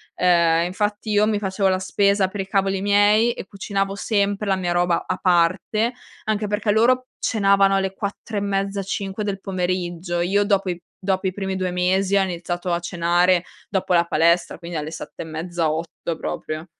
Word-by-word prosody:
ehm, 170 -2 +3
infatti 205 +4 -2
io 210 +1 +4
mi 215 -1 +1
facevo 195 0 0
la 185 0 +2
spesa 200 0 +2
per 205 - -7
i 195 - -3
cavoli 195 -1 +1
miei 205 +3 +4
e - - -8
cucinavo 195 0 -2
sempre 200 0 0
la 195 - +3
mia 180 -2 -2
roba 175 -1 +1
a 185 - -2
parte, 185 +6 +2 0.3
anche 215 -1 -1
perché 205 +1 0
loro 255 +4 +3
cenavano 195 -2 +3
alle 195 0 0
4 205 +1 -5
e - - +2
mezza, 200 0 -1
5 195 +2 -3
del 195 -1 -3
pomeriggio, 180 -2 -2
io 200 +3 +2
dopo 200 -2 +1
i 175 -1 -3 0.2
dopo 190 0 -1
i 185 - -2
primi 195 -1 -3
2 185 -1 -1
mesi 185 +2 +1
ho 195 - +5
iniziato 175 0 -3
a 170 - +1
cenare 175 +1 +2 0.3
dopo 190 -2 0
la 170 -1 +4
palestra, 170 +1 +2
quindi 170 -1 -6
alle 150 0 -4
7 - - -8
e - - -10
mezza, 165 +1 -2
8 165 +1 -4
proprio. 155 0 -5
190 Hz, 185 wpm, -22 LUFS, 175-200 Hz, 0.3 s, ho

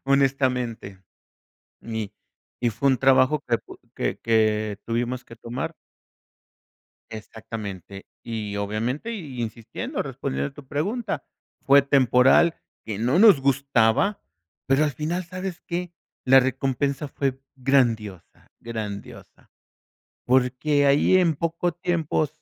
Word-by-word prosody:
honestamente, 130 -7 0 0.8
y 110 -2 -5 0.5
y 120 - +1
fue 140 +5 0
un 130 -3 +3
trabajo 135 +2 +4
que 115 - +2 0.4
que - - -2
que 110 -2 +1
tuvimos 120 +2 -2
que 115 - -13
tomar 130 +8 -5 1.4
Exactamente 105 -3 -8 0.2
y 105 -3 -4
obviamente 115 - -2
y 145 - -6
insistiendo, 115 0 -4
respondiendo 70 +2 -3
a - - -26
tu 140 -2 -12
pregunta, 200 - -2 0.4
fue 140 +1 +6
temporal, 135 +4 +4 0.3
que 105 -2 -5
no 125 +9 +2
nos 205 -10 +7
gustaba, 140 - +2 0.5
pero 135 +3 +3
al 150 - +1
final, 170 +5 -3
¿sabes 185 0 -6
qué?, 175 0 -4 0.3
la 135 +1 +7
recompensa 135 +2 0
fue 135 -1 -2 0.2
grandiosa, 115 -8 0
grandiosa, 110 -4 -8 0.8
porque 130 +3 +2
ahí 145 +6 +4
en 170 -4 +3
poco 170 +3 -1
tiempo 170 -4 -1
130 Hz, 110 wpm, -24 LUFS, 115-150 Hz, 1.4 s, nos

